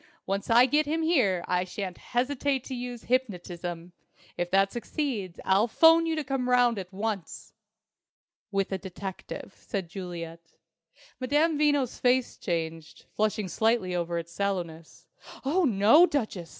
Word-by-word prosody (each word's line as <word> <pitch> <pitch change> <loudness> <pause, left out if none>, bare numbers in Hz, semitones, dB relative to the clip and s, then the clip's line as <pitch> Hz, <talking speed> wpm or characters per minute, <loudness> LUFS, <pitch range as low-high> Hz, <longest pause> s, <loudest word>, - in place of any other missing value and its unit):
Once 195 +1 -3
I 235 +2 +7
get 295 +3 +2
him 320 +2 0
here 215 - +2
I 180 0 +1
shan't 185 0 -6
hesitate 265 +1 -1
to 265 - -7
use 245 -2 -6
hypnotism. 180 -8 -3 0.4
If 175 0 -2
that 195 +1 +3
succeeds, 235 - -3
I'll 195 +4 +3
'phone 325 +7 +5
you 325 - 0
to 310 - -2
come 260 -2 -2
round 245 -3 +4
at 185 -1 -8
once." 200 -2 -5 1.0
"With 195 -1 -1
a 190 - -2
detective," 190 0 -7
said 195 -7 -4
Juliet. 170 -3 -8 0.7
Madame 295 +5 +2
Veno's 290 -4 +1
face 250 0 +2
changed, 165 -3 -4
flushing 215 -1 0
slightly 220 -1 +1
over 170 -1 -1
its 170 0 -5
sallowness. 170 -4 -4 0.4
"Oh, 340 +6 +2
no, 230 - +6
Duchess!" 215 - -3
210 Hz, 140 wpm, -28 LUFS, 180-260 Hz, 1.0 s, I